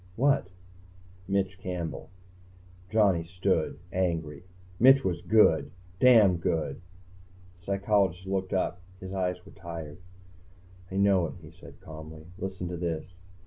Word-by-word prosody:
"What?" 140 -3 +2 0.8
"Mitch 95 -1 -1
Campbell." 90 -3 -5 0.8
Johnny 100 -6 +3
stood, 90 -1 -1 0.2
angry. 80 -5 -1 0.4
"Mitch 135 +2 +7
was 85 -2 -1
good. 85 -6 +4 0.3
Damn 110 -8 +6
good." 80 0 -2 0.8
The - - -24
psychologist 100 -2 +1
looked 95 -1 -2
up, 90 -1 -1 0.2
and 95 0 -8
his - - -5
eyes 90 -1 -2
were 100 - -13
tired. 85 -3 -8 0.9
"I - - -5
know 100 -3 +3
it," - - -8
he 80 - -12
said 90 - -15
calmly. 80 0 -10
"Listen 95 -2 -4
to 90 - -4
this." 85 +1 -4
90 Hz, 130 wpm, -28 LUFS, 85-100 Hz, 0.9 s, Mitch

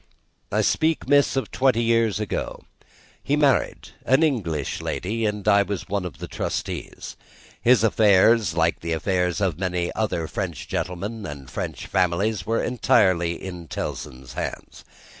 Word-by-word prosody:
"I - - +2
speak, 160 0 +1
miss, 145 -1 +4
of 135 - -2
twenty 130 -3 +2
years 115 -2 +2
ago. 105 - -4 0.6
He 140 - 0
married 145 -3 +1
an 135 +6 +3
English 90 - -1
lady 110 +4 -2
and 105 -1 -4
I 100 -1 +6
was 100 -1 -3
one 100 -1 -2
of 90 - -7
the - - -7
trustees. - - -5 0.5
His 120 -1 +5
affairs, 105 -3 +4
like 85 0 +1
the 85 0 -3
affairs 90 +3 0
of 90 -5 0
many 90 -2 -1
other 90 -7 -1
French - - -4
gentlemen 100 +5 -4
and 70 -3 -9
French - - -5
families, 95 +5 0
were 115 +1 +1
entirely 90 -8 +2
in 90 -3 -7
Tellson's 65 -3 -6
hands. - - -6
100 Hz, 145 wpm, -24 LUFS, 85-115 Hz, 0.6 s, I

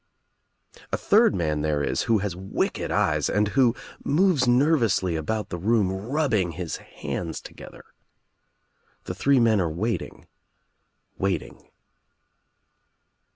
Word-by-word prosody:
A - - 0
third - - +4
man 75 -4 -1
there 75 -1 0
is 70 - 0
who 115 - +5
has 95 -4 -3
wicked 95 +2 -2
eyes - - +1
and 105 0 +1
who 125 -1 +3 0.3
moves 155 -4 +2
nervously 120 - +2
about 105 +7 -3
the 90 - -5
room 105 0 +2
rubbing 110 - -1
his 85 0 -4
hands 80 -2 -6
together. - - -12 1.2
The - - -5
three 135 +8 +3
men 110 -4 +3
are 85 - 0
waiting 105 +9 -4 0.5
— - - -48
waiting. 95 -4 -3
100 Hz, 120 wpm, -25 LUFS, 85-120 Hz, 1.2 s, who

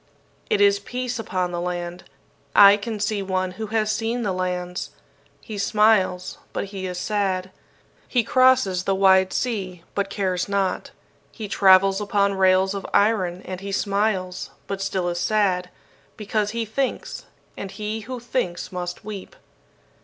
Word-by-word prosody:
"It 430 -2 +2
is 405 0 +5
peace 250 -5 -4
upon 185 -5 -2
the 175 0 -3
land. 175 0 -4 0.5
I 200 0 +9
can 215 +1 -5
see 210 0 -1
one 185 -1 -1
who 215 +4 -6
has 215 0 0
seen 225 +2 -1
the 200 - 0
lands. 180 -1 -3 0.5
He 210 +4 -7
smiles, 200 -4 +2
but - - -2
he 190 -1 -4
is 180 -1 -5
sad. 190 -2 -1 0.6
He 245 -3 +2
crosses 255 -7 +3
the 195 - +1
wide 190 -1 +5
sea, 190 -8 -3
but 200 -1 -1
cares 190 -2 -1
not. 200 -1 -1 0.4
He 220 -3 -7
travels 195 0 +5
upon 200 -1 +1
rails 190 0 +3
of 200 -1 -4
iron, 190 -4 +2
and 185 0 -6
he 200 0 -5
smiles, 195 -2 -1 0.2
but 195 -1 -4
still 190 -2 -1
is 175 0 -2
sad, 185 -3 +1 0.5
because 210 0 -1
he 230 +1 -2
thinks; 255 +5 -3 0.3
and 195 - -6
he 215 +2 -4
who 250 +3 -6
thinks 235 -7 -3
must 180 +1 -5
weep. 205 -3 -7
195 Hz, 155 wpm, -23 LUFS, 185-215 Hz, 0.6 s, I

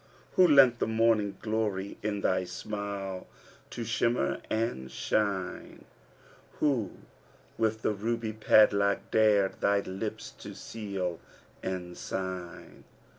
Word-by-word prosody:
Who 185 - +6
lent 135 -6 +6
the - - +1
morning 110 -2 +2
glory 105 -3 -2
in 105 -1 -2
thy 95 -1 +1
smile 100 0 -5 0.4
to 120 - -5
shimmer 115 - 0
and 110 - -1
shine 100 -4 -2 0.3
* - - -27
Who 130 -10 +1 0.6
with 110 -1 0
that - - +2
ruby 110 +2 -2
padlock 100 -2 +4
dared 105 -3 +3
thy 100 0 +3
lips 105 +3 -5
to - - -8
seal 95 -6 -4 0.4
and 90 -2 -4
sign! 95 -2 -6
105 Hz, 115 wpm, -29 LUFS, 95-110 Hz, 0.6 s, Who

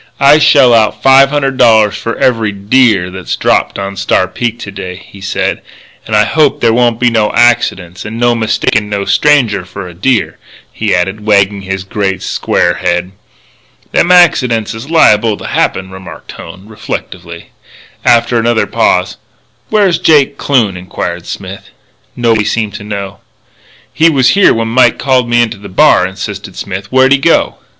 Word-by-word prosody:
"I 140 +2 +5
shell 135 -5 +4
out 110 -2 +1
five 135 0 +5
hundred 135 -2 -2
dollars 110 -4 +3
for 115 - -4
every 115 -4 0
deer 100 -2 +1
that's 95 -1 -5
dropped - - 0
on 100 0 -5
Star 95 -1 0
Peak 115 +5 -4
to 100 - -7
day," 95 -2 -7
he 95 +1 -15
said. 100 - -3 0.5
"And 110 - -1
I 105 - +4
hope 155 -3 +1
there 115 -1 +2
won't 120 -1 +1
be 120 -1 +2
no 110 -2 0
accidents 100 -7 0
and 110 +2 -7
no 120 0 +2
mistakin' 110 -2 -1
no 100 -1 -3
stranger 145 -10 +1
for 90 +1 -9
a 90 - -11
deer," 105 +5 -1 0.3
he 110 -3 -1
added, 95 +4 -2
wagging 100 -1 +2
his 95 0 -5
great, 95 -1 -3
square - - -1
head. 90 +1 -1 0.8
"Them 175 - +1
accidents 125 -12 +3
is 110 +6 -9
liable 110 -9 +3
to - - -10
happen," 95 0 -2
remarked 95 0 -11
Hone, 90 +5 -12
reflectively. 90 -5 -8 0.5
After 120 0 +2
another 115 0 0
pause: - - 0 0.5
"Where's 200 -6 +1
Jake 150 -6 +3
Kloon?" 115 -11 0
inquired 90 -1 -6
Smith. 95 0 -8 0.5
Nobody 115 -3 0
seemed 110 -1 -2
to - - -8
know. 100 -1 -6 0.7
"He 165 +1 +3
was 135 -5 +2
here 200 0 +4
when 115 0 -1
Mike 120 +1 +3
called 130 -3 0
me 120 0 +3
into 110 -3 -4
the 100 - -11
bar," 90 0 +3
insisted 100 0 -8
Smith. 95 0 -6
"Where'd 130 +1 +3
he 140 - +4
go?" - - +1
110 Hz, 165 wpm, -11 LUFS, 95-125 Hz, 0.8 s, I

